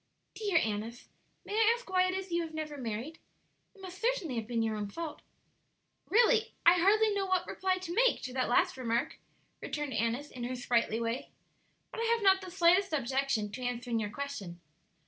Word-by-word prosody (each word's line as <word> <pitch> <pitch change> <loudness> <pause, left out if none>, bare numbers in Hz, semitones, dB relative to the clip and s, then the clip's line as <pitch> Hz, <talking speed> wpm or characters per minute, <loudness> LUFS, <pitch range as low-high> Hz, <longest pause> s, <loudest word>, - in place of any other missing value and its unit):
"Dear 410 -6 0
Annis, 225 -1 -2 0.4
may - - -6
I 450 +1 +4
ask 485 - -14
why 370 -1 +3
it 370 - -1
is 380 -1 -5
you 340 0 +1
have 320 -1 -6
never 305 -1 -4
married? 250 +4 -5 0.6
It 395 - -17
must 375 0 -9
certainly 450 - 0
have 220 -1 -3
been 230 -2 0
your 220 -1 -1
own 210 -1 -3
fault." 325 +6 -6 0.9
"Really, 455 +1 +4
I 350 +2 +7
hardly 425 +4 +4
know 395 -1 -1
what 370 -1 +1
reply 375 0 -1
to 365 -2 -6
make - - +3
to 255 - -5
that 255 -2 0
last 245 - +2
remark," 245 +4 -1 0.4
returned 295 -3 -4
Annis, 230 +6 -1
in 245 - -7
her 255 +1 -3
sprightly 235 -2 0
way. 230 +2 -3 0.6
"But - - -7
I 460 - 0
have 460 -1 +1
not 385 -1 +5
the 375 - -8
slightest 360 +1 +3
objection 265 -6 0
to 255 - -7
answering 245 -1 -2
your 210 -2 -2
question. 205 -9 -6
310 Hz, 195 wpm, -31 LUFS, 240-380 Hz, 0.9 s, I